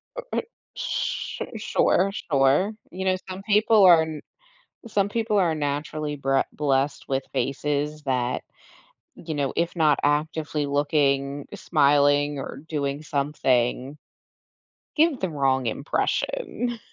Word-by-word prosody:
Uh - - -4 0.2
uh, - - +2 0.3
sure - - -3
sure, 195 +2 +2
sure. 145 +5 +2 0.2
You 190 +2 -5
know, 185 0 +3
some 185 +1 -6
people 215 0 +4
are 170 -3 +8
n 155 -2 -6 0.7
some 200 -2 +1
people 220 -1 0
are 170 -4 +2
naturally 150 +1 -3
bre 135 -1 +1
blessed 140 -1 0
with 135 0 -1
faces 150 +2 -2
that, 125 -2 -1 0.7
you 160 -2 -6
know, 140 -2 -1
if 170 +1 -1
not 155 -3 +3
actively 150 0 0
looking, 140 -1 0
smiling, 145 0 +3
or 135 - -6
doing 145 -1 -2
something, 140 -2 0 1.0
give 315 -3 +3
the 185 -3 -1
wrong 135 -3 +1
impression. 240 - -2
150 Hz, 120 wpm, -25 LUFS, 140-175 Hz, 1.0 s, are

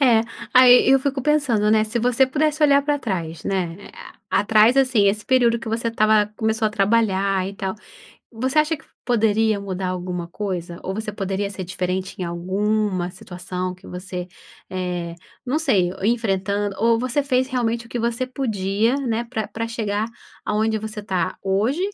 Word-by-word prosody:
É. 235 -5 +5 0.3
Aí 250 -1 +7
eu 270 - +6
fico 270 -1 -2
pensando, 260 -9 +2
né, 215 0 +4
se 225 +2 -2
você 250 +2 +3
pudesse 305 +3 0
olhar 280 -1 +5
pra 290 0 0
trás, 170 - -4
né, 180 -4 -1 0.5
a - - +3
atrás 220 +4 +4
assim, 255 -7 +4
esse 210 +2 +1
período 240 -3 +3
que 225 - -7
você 230 +1 -1
estava 215 -2 +3
começou 220 0 0
a 215 - 0
trabalhar, 195 -2 +1
e 200 - -8
tal. 195 0 -3 0.6
Você 260 +6 -1
acha 310 +1 +2
que - - -19 0.2
poderia 220 -2 +2
mudar 190 -2 -4
alguma 180 -1 -4
coisa? 175 -3 -4
Ou 190 - -4
você 215 0 -4
poderia 195 0 -2
ser 190 -2 -6
diferente 185 +1 -3
em - - -1
alguma 185 +2 -1
situação 180 0 -5
que 185 - -17
você, 180 0 -6 0.4
eh, 180 -2 -3 0.3
não 285 +5 +1
sei, 195 - +2
o - - -8
enfrentando 205 -3 0
ou 230 +1 +3
você 255 +4 0
fez 260 -1 +1
realmente 235 -2 -1
o - - -18
que 240 - -4
você 235 +2 -1
podia, 225 -2 0
né, 235 -4 -1
pra 225 -3 -4
pra 230 +1 -4
chegar 215 -2 -2 0.4
aonde 220 +1 0
você 215 0 -6
está 190 -3 -2
hoje, 210 - 0
215 Hz, 175 wpm, -22 LUFS, 190-240 Hz, 0.6 s, Aí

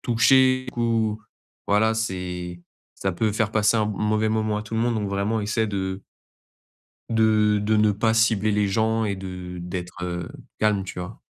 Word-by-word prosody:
touchés 130 +2 +4
ou 115 -2 0 0.5
voilà 110 +2 +3
c'est 90 -5 -4 0.3
ça 95 -1 -2
peut 110 +4 0
faire 110 -1 0
passer 110 +1 +3
un 110 - +2
m 105 - -2
mauvais 110 +2 0
moment 110 -1 0
à 105 - -3
tout 110 - -13
le 110 - +1
monde 120 0 +1
donc 105 -2 -2
vraiment 100 +3 -1
essaie 110 +1 0
de 95 -1 -3 1.1
de 110 -2 +3
de 110 +1 +2
ne 105 -1 +4
pas 110 +2 +1
cibler 110 -2 +3
les 105 0 +2
gens 110 +2 +1
et 100 -2 -1
de 90 -2 -7
d'être, 90 0 -6
heu, 85 -1 -4 0.3
calme, 105 -2 +2
tu 95 - -8
vois? 90 +5 -7
105 Hz, 180 wpm, -24 LUFS, 95-110 Hz, 1.1 s, touchés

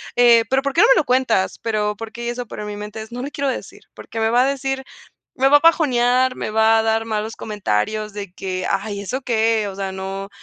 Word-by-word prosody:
eh, 235 -2 +6
pero 265 +1 +2
¿por 280 -1 -2
qué - - +4
no - - +7
me - - 0
lo - - +2
cuentas?", 250 -6 +1
pero 210 -2 -1
porque 230 +1 -6
eso 240 -1 -5
pero - - -7
en - - -6
mi 205 - -6
mente 210 +1 -7
no 245 +1 -5
le 285 - -5
quiero 280 -1 -1
decir 255 - -6
porque 225 - -7
me 220 0 +2
va 245 +2 +4
a - - +2
decir 270 -1 -2 0.5
me 265 +1 +3
va 290 - +8
a - - -1
bajonear, 255 -6 +3
me - - -4
va 220 +1 +4
a - - +1
dar 225 0 +1
malos 220 0 -3
comentarios 210 - -2
de 200 -3 -7
que: 185 -1 -4
"Ay, 200 +1 -2
¿eso 255 +7 -4
qué?, 225 -3 +1
o 190 - -8
sea, 195 -1 -4
no, 195 +1 -5
225 Hz, 240 wpm, -20 LUFS, 210-250 Hz, 0.5 s, va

